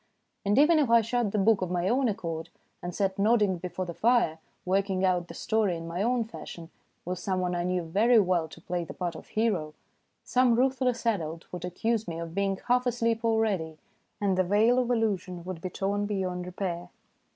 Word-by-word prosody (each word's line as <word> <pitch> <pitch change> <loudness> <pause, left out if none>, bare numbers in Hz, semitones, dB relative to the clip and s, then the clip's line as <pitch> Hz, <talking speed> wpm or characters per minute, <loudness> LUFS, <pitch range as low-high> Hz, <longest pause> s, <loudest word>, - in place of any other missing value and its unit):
And 205 +1 +1
even 310 +3 +6
if 280 -5 +2
I 235 0 +6
shut 230 -1 0
the 215 - -1
book 205 0 +3
of 185 - -1
my 175 0 0
own 255 +3 +2
accord, 165 -5 -4 0.3
and 175 - -4
sat 195 -1 -1
nodding 210 -3 +3
before 180 +1 -4
the 170 - -6
fire, 230 -7 +2 0.3
working 190 0 +1
out 180 -2 +1
the 170 - -10
story 210 -4 0
in 165 0 -7
my 170 +3 -3
own 240 +2 +2
fashion 170 -6 -10 0.3
with 180 0 -3
some 185 0 -1
one 180 -1 -1
I 175 0 -1
knew 180 0 0
very 215 +9 +3
well 180 -5 +2
to 160 - -13
play 175 0 -2
the - - -9
part 175 -2 -3
of - - -11
hero, 190 -9 -1 0.5
some 250 -2 +3
ruthless 255 -1 +1
adult 165 -7 -1
would 180 -1 -4
accuse 220 +5 -1
me 165 -1 -4
of 165 -1 -6
being 195 0 0
" - - -26
half 250 +1 +3
asleep 230 -1 0
already," 210 -9 0 0.4
and 195 -2 +1
the - - +5
veil 215 +7 +3
of 250 -1 0
illusion 195 -7 -1
would 180 -2 -6
be 185 - -3
torn 200 +3 -1
beyond 185 -3 -2
repair. 180 -1 -4
195 Hz, 205 wpm, -28 LUFS, 175-225 Hz, 0.5 s, even